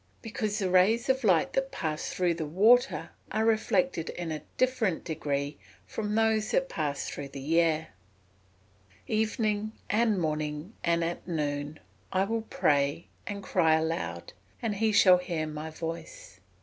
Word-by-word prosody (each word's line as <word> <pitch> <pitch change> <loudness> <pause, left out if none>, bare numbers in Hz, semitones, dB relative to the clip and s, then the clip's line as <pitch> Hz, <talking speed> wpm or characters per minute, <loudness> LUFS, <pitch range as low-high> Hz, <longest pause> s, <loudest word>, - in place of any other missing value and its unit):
_ - - -36
Because 215 -2 -2
the 195 -4 0
rays 215 +7 +4
of 265 0 +2
light 180 -7 +3
that 270 0 0
pass 155 -1 -3
through 180 -2 +1
the 160 -2 -4
water 220 +10 +3 0.2
are 220 - +1
reflected 225 -3 +1
in 175 -2 -4
a 155 -2 -4 0.2
different 235 -9 +1
degree 145 -3 -3 0.3
to - - -2
those 215 0 +1
that 270 - +1
pass 145 -3 -2
through 145 - -5
the 140 +5 +1
air. 160 -1 0
[Verse: 95 0 -33
"Evening, 215 -1 0 0.2
and 215 -2 +2
morning, 155 +3 -2
and 170 0 +2
at 170 +1 -4
noon, 150 -2 -2 0.3
will 195 +5 +1
I - - -10
pray, 145 +2 +2 0.2
and 200 -1 -5
cry 160 -5 +3
aloud; 120 - -2 0.3
and 215 -4 -2
he 220 +1 +2
shall 185 -3 +7
hear 170 -3 -2
my 155 +1 -5
voice." 165 - -7
170 Hz, 155 wpm, -29 LUFS, 150-215 Hz, 0.3 s, shall